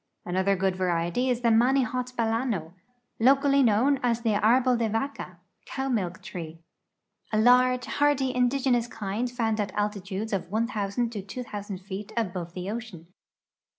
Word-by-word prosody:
Another 190 +2 +1
good 190 0 0
variety 180 +6 0
is 245 -1 0
the 235 - +3
mnnihot 250 +1 +2
b(d(ino, 225 -7 -1 0.5
locally 275 +3 +4
known 255 +4 +3
as 235 -1 +1
the 225 -2 +1
" - - -9
arbolde 240 -1 +3
vaca 225 -6 -3
" - - -45
(cow 270 0 -3
milk 190 -6 -2
tree), 165 -3 -7 0.7
a 215 - +1
large^ 250 +2 +4
hardy, 285 -3 +1
indigenous 250 -1 +2
kind 225 +2 -3
found 225 -3 -1
at 205 -2 -1
altitudes 205 0 -3
of 185 -3 -2
1,000 220 +1 -1
to 210 -4 -5
2,000 205 -1 -6
feet 195 +2 -7
above 180 -6 -3
the 180 0 -5
ocean. 195 -7 -8
225 Hz, 150 wpm, -27 LUFS, 195-250 Hz, 0.7 s, locally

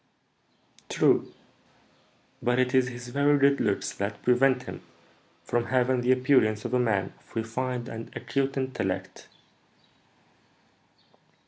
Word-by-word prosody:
"True, - - +2 1.1
but 125 0 +1
it 125 -1 +1
is 130 -1 +4
his 120 -1 -8
very 145 +3 +3
good 140 0 +3
looks 100 -2 0
that 100 +1 -4
prevent 125 +1 +3
him - - -8 0.6
from 120 +7 -1
having 130 0 +1
the 125 +1 +2
appearance 125 -5 +3
of - - -3
a 125 - +3
man 110 -6 0
of - - -23
refined 120 +2 -3
and 115 0 -7
acute 135 +3 -2
intellect." 130 -1 -3
125 Hz, 120 wpm, -27 LUFS, 115-130 Hz, 1.1 s, is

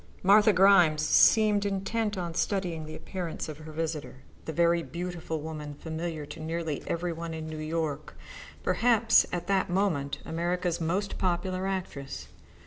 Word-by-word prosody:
Martha 210 +3 +6
Grimes 180 -5 +5
seemed 215 -2 +5
to 200 - 0
be 195 - -1
intent 210 +1 -2
upon 170 -2 -3
studying 175 -4 -1
the 155 - -7
appearance 180 -5 -5
of 155 -1 -8
her 155 0 -9
visitor, 155 -4 -4 0.2
the - - -3
very 170 +1 +3
beautiful 170 -2 -5
woman 150 -2 -6
familiar 160 0 -5
to 160 - -10
nearly 160 -1 -3
every 170 0 -2
one 165 0 -5
in 160 0 -5
New 155 0 -6
York, 155 -2 -3 0.5
perhaps 230 -2 +4
at 175 -1 -3
that 195 0 +1
moment 175 -7 0
America's 175 +1 -1
most 185 +5 -1
popular 185 +1 -1
actress. 180 -8 -5
170 Hz, 155 wpm, -28 LUFS, 160-190 Hz, 0.5 s, Martha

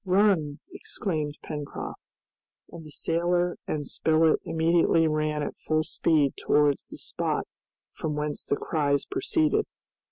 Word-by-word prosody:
"Run!" 185 -6 +2
exclaimed 155 -6 -3
Pencroft. 150 -2 -6 0.7
And 170 - -9
the 155 - -11
sailor 175 +3 0
and 145 -2 -2
Spilett 160 0 +3
immediately 165 0 +3
ran 155 -1 0
at - - -5
full 155 0 +1
speed 155 -2 +2
towards 145 -1 +3
the - - -10
spot - - -2 0.5
from 150 -2 -3
whence 150 0 -3
the - - 0
cries 145 -3 0
proceeded. 380 0 +1
155 Hz, 125 wpm, -27 LUFS, 150-175 Hz, 0.7 s, Spilett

